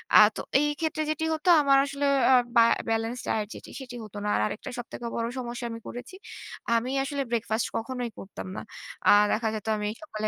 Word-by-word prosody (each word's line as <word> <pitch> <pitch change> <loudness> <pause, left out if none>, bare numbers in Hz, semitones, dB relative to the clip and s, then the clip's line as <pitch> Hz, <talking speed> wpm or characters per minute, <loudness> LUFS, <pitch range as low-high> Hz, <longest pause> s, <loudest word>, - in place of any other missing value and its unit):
আ - - +11 0.2
তো - - -3 0.2
এই 295 +1 +2
ক্ষেত্রে 315 -1 -1
যেটি 310 +1 -1
হতো 315 +3 0
আমার 275 -1 +5
আসলে 280 +1 -2 0.3
আ - - +7 0.2
বা 230 - +8 0.3
balanced 225 +2 -1
diet 215 -1 0
যেটি - - -11
সেটি 250 -2 -8
হত 210 -1 -12
না। - - -2
আর - - +1
আরেকটা 210 - -5
সবথেকে 240 0 -7
বড় 230 0 -1
সমস্যা 240 -1 -4
আমি 230 - -6
করেছি। 245 +9 -8 0.6
আমি 235 +3 0
আসলে 280 0 -2
ব্রেকফাস্ট 225 -1 0
কখনোই 245 +1 -4
করতাম 195 -1 -8
না। - - -4 0.5
আ - - +9 0.2
দেখা 225 +1 0
যেত 215 0 -6
আমি 210 0 -2
সকালে 215 -9 -3
240 Hz, 200 wpm, -27 LUFS, 225-275 Hz, 0.6 s, আ